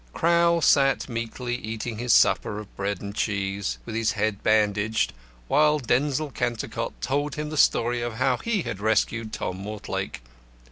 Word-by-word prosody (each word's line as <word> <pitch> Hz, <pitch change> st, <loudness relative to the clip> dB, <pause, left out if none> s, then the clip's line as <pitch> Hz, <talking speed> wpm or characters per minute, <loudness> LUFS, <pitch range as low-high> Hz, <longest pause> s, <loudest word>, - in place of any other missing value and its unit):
Crowl 170 Hz, 0 st, +3 dB
sat 135 Hz, -2 st, +4 dB
meekly 120 Hz, 0 st, -4 dB
eating 110 Hz, -1 st, -5 dB
his 120 Hz, 0 st, 0 dB
supper 105 Hz, -, +4 dB
of 105 Hz, -2 st, -9 dB
bread 100 Hz, -1 st, -2 dB
and 100 Hz, 0 st, -6 dB
cheese, 100 Hz, -1 st, -2 dB
with 115 Hz, -, -6 dB
his 115 Hz, 0 st, +1 dB
head 105 Hz, -1 st, -1 dB
bandaged, 110 Hz, 0 st, +2 dB, 0.3 s
while 150 Hz, +1 st, +4 dB
Denzil 140 Hz, +3 st, 0 dB
Cantercot 120 Hz, -3 st, -3 dB
told 145 Hz, +2 st, -1 dB
him 150 Hz, 0 st, -4 dB
the -, -, -4 dB
story 120 Hz, -4 st, +3 dB
of 120 Hz, -1 st, -3 dB
how 130 Hz, +1 st, +2 dB
he 215 Hz, -, -1 dB
had 95 Hz, -, -5 dB
rescued 110 Hz, +1 st, 0 dB
Tom 95 Hz, -3 st, -4 dB
Mortlake. 100 Hz, -, -5 dB
115 Hz, 155 wpm, -25 LUFS, 105-135 Hz, 0.3 s, sat